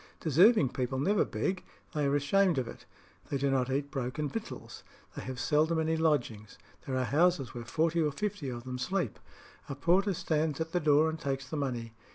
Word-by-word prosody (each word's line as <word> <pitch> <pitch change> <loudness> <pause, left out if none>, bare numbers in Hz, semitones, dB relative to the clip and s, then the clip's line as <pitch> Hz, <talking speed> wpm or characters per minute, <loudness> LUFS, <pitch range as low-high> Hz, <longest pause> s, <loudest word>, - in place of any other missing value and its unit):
Deserving 170 - +5
people 130 +1 -2
never 195 +10 +2
beg: 185 0 -2 0.3
they 150 -3 +1
are 140 - +2
ashamed 175 +4 +3
of 125 -3 -1
it. - - -11 0.4
They 140 - 0
do 140 0 +1
not 130 -1 +1
eat 140 +1 -1
broken 135 +2 -2
victuals. 225 +6 -7 0.3
They - - -5
have 130 -1 -6
seldom 155 +3 +2
any 160 0 +1
lodgings. 120 -10 0 0.3
There 130 -1 -1
are 130 - +1
houses 155 -1 +2
where 120 -2 -6
forty 165 +5 +1
or 150 -2 +1
fifty 155 -4 -3
of 120 -1 -6
them 125 0 -5
sleep. 175 - -2 0.5
A 140 - -3
porter 185 +7 +2
stands 160 -4 -1
at 160 0 -3
the 180 - +1
door 150 0 +4
and 160 0 -3
takes 135 -1 -3
the 145 - -5
money. 120 -6 -3
145 Hz, 200 wpm, -30 LUFS, 130-165 Hz, 0.5 s, Deserving